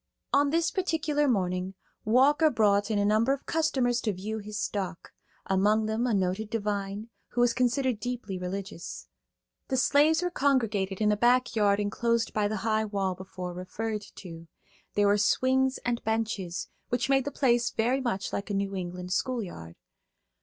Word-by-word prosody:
On 285 0 +4
this 330 +3 +1
particular 310 -6 0
morning, 185 -4 0 0.3
Walker 280 +8 +4
brought 205 -4 +2
in 215 - 0
a 205 - +2
number 220 +5 +3
of 275 - -6
customers 260 -7 +1
to 215 - 0
view 210 +4 -4
his 210 0 -6
stock; 190 -6 -4 0.3
among 210 +3 +2
them 220 +3 0
a 235 - +1
noted 190 +3 -1
divine, 205 0 -3 0.2
who 245 - -1
was 240 -1 +4
considered 250 -1 +1
deeply 240 -6 -4
religious. 180 - -6 0.6
The 260 - -1
slaves 300 +6 +4
were 355 - -1
congregated 225 - 0
in 210 0 +4
a - - +3
back 245 +3 +3
yard 205 -2 +3
enclosed 230 +2 0
by 210 -1 +1
the 215 +1 -2
high 220 -1 +2
wall 195 -3 -1
before 185 -1 -7
referred 210 +4 -4
to. 165 -3 -10 0.5
There 205 - +3
were 205 +1 +4
swings 260 +4 +2
and 240 -1 -1
benches, 215 -5 -2 0.2
which 245 +1 0
made 270 -1 +3
the - - -1
place 240 -4 +2
very 245 +4 0
much 230 -6 -2
like 200 - -3
a 205 - -1
New 195 0 -1
England 180 0 -4
schoolyard. 190 - -3
220 Hz, 165 wpm, -28 LUFS, 195-250 Hz, 0.6 s, On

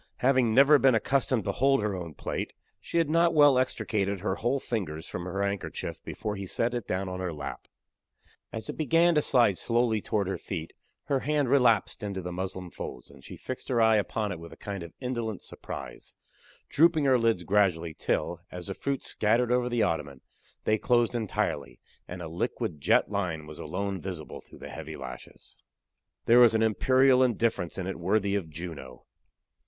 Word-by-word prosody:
Having 125 -4 +3
never 140 +2 +7
been 130 -3 +5
accustomed 130 -1 +1
to 100 - -1
hold 135 +6 +3
her 105 -1 0
own 85 -4 -7
plate, - - -4 0.3
she - - -4
had 165 -2 +3
not 165 +2 +3
well 145 -4 +6
extricated 100 -6 -1
her 105 - 0
whole 125 +4 0
fingers 90 - -4
from 90 - -5
her 95 +2 -2
handkerchief 100 -1 -4
before 105 -1 -4
he 95 -1 -6
set 115 +6 0
it 120 -3 -4
down 95 +1 -2
in 90 0 -5
her 90 -2 -2
lap. 75 -3 -7 0.8
As 110 - -6
it - - -3
began 165 +2 +4
to 150 - +3
slide 120 -10 +3
slowly 115 -2 +1
toward 100 -1 -1
her 95 - -3
feet, 80 -5 -6 0.3
her 140 - 0
hand 145 -1 0
relapsed 125 -6 +3
into 100 -2 -4
the 90 -1 -5
muslin 95 0 -5
folds, - - -8
and 70 -1 -17
she - - -9
fixed 130 - -6
her 125 -3 +2
eye 110 -1 +5
upon 105 0 -1
it 90 - -5
with 85 0 -10
a - - -12
kind 100 -2 -6
of 85 -1 -9
indolent 120 -5 -3
surprise, - - -8 0.5
drooping 160 -1 +4
her 130 -2 +4
lids 115 -6 +1
gradually 90 -4 +1
till, 85 +2 -2
as 90 -1 -8
the 95 - -4
fruit 140 +5 -3
scattered 115 +3 +1
over 125 0 +2
the 120 -2 +1
ottoman, 70 -5 -2 0.4
they 110 0 +2
closed 120 -1 +2
entirely, 115 -4 -2 0.3
and 90 0 -7
a - - -5
liquid 80 -2 -3
jet - - +3
line 85 -6 -2
was 75 0 -10
alone 95 +4 -3
visible 90 -5 -7
through - - -16
the - - -9
heavy - - -7
lashes. 65 - -10 0.7
There 120 +2 +6
was 120 -2 +7
an 110 - +3
imperial 130 +4 +4
indifference 115 -7 0
in 95 - -3
it 95 0 -4
worthy 100 +3 +1
of 95 -5 -2
Juno. 80 -6 -8
105 Hz, 190 wpm, -28 LUFS, 90-125 Hz, 0.8 s, never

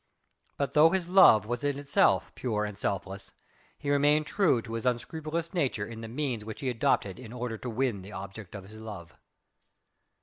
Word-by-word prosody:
But 140 - -2
though 150 +2 +7
his 180 -1 -1
love 175 - +7
was 120 +4 -3
in 145 -1 0
itself 140 0 +2
pure 105 -4 -1
and 105 -1 -6
selfless, 100 0 -4 0.4
he 145 -1 -2
remained 145 +2 +3
true 175 - +2
to 115 - -8
his 115 -1 -3
unscrupulous 155 +7 -2
nature 135 - 0
in 115 +1 -8
the 115 - -6
means 125 -2 -3
which 110 0 -8
he 135 - -1
adopted 105 -4 0
in 120 -3 -10
order 120 -2 -4
to 125 - -5
win 120 -3 -1
the 95 +3 -11
object 100 0 -8
of 95 -2 -8
his 110 +1 -12
love. 100 -7 -9
120 Hz, 190 wpm, -29 LUFS, 105-145 Hz, 0.4 s, though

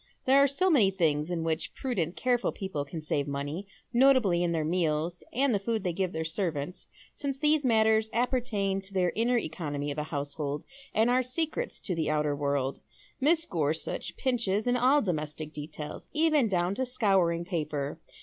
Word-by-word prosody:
There 270 +1 +6
are 280 - +6
so 360 +7 +2
many 230 -11 +5
things 160 -5 +1
in 170 -2 -2
wliich 160 0 -2
prudent 190 - -2
careful 245 -1 +1
people 190 -8 -4
can 160 +3 -6
save 150 -2 -1
money; 145 +7 -4 0.3
notably 240 -9 +4
in 175 -1 +1
their 160 -2 0
meals 165 0 0
and 265 +1 +2
the 205 - +2
food 220 +1 -2
they 180 -3 -1
give 185 0 -1
their 160 -1 -3
servants, 165 -2 -3 0.3
since 275 -2 -4
these 300 0 +3
matters 220 -2 +3
appertain 230 -5 0
to 195 +1 -10
ths 180 -2 +2
inner 240 +2 +2
economy 150 -6 -3
of 145 - -4
a - - -1
household, 145 -1 -4 0.3
and 225 +3 +3
are 255 +1 +4
secrets 315 - -3
to 185 - -1
the 160 -3 -1
outer 150 -1 +1
world 140 -2 -1 0.4
Mrs. 325 +4 +3
Gorsuch 160 -2 -2
pinches 225 -5 0
in 245 0 +2
all 260 +4 +4
domestic 155 -4 -3
details, 150 0 -7
even 310 -5 +3
down 180 -1 +1
to 260 +6 -1
scouring 190 -8 +2
paper. 150 -4 -3
185 Hz, 180 wpm, -29 LUFS, 155-245 Hz, 0.4 s, There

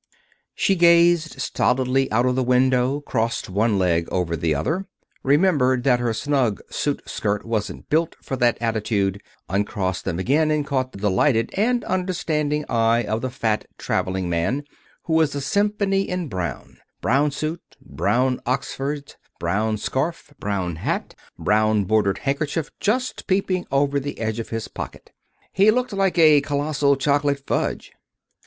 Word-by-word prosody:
She 195 - +2
gazed 170 -3 +4
stolidly 130 0 +1
out 120 +3 +2
of 125 - +2
the 130 - +1
window, 130 +2 +2
crossed 115 -7 -2
one 105 +2 +2
leg 85 -3 +1
over 90 -3 0
the 80 -1 0
other, 170 - -2 0.3
remembered 140 -4 +3
that 125 -2 +3
her 120 -1 0
snug 125 - 0
suit - - -2
skirt 105 -1 -2
wasn't 110 -3 -3
built 160 +2 +1
for 135 - -4
that 120 -2 +2
attitude, 105 -3 -1 0.3
uncrossed 95 -1 -1
them 85 -3 -2
again, 145 - +2
and 150 -1 +1
caught 130 -3 -1
the - - -10
delighted 110 +4 +2
and 235 +4 +1
understanding 155 -5 -1
eye 115 +1 +2
of 110 +1 -2
the 130 - -2
fat 110 -3 -1
traveling 95 -1 -1
man, 85 +12 0 0.4
who 165 - -2
was 160 -3 +3
a - - -1
symphony 200 +4 +1
in 180 -3 -2
brown 90 -5 -5 0.2
brown 140 +5 +2
suit, 155 +4 -4 0.2
brown 125 +5 0
oxfords, 140 +2 -3 0.2
brown 105 +6 0
scarf, 145 +7 -3
brown 95 -4 -2
bat, - - -2 0.2
brown 110 0 +2
bordered 100 -1 +1
handkerchief 145 +3 -2
just 250 +5 -1
peeping 185 -1 0
over 140 +1 +2
the 145 +1 -5
edge 110 0 -2
of 115 - -5
his 115 -1 -4
pocket. - - -8 0.4
He 200 +3 +5
looked 250 0 +1
like 195 -2 +1
a 155 -3 +7
colossal 145 0 +1
chocolate 140 0 0
fudge. - - -2
130 Hz, 150 wpm, -22 LUFS, 110-155 Hz, 0.4 s, a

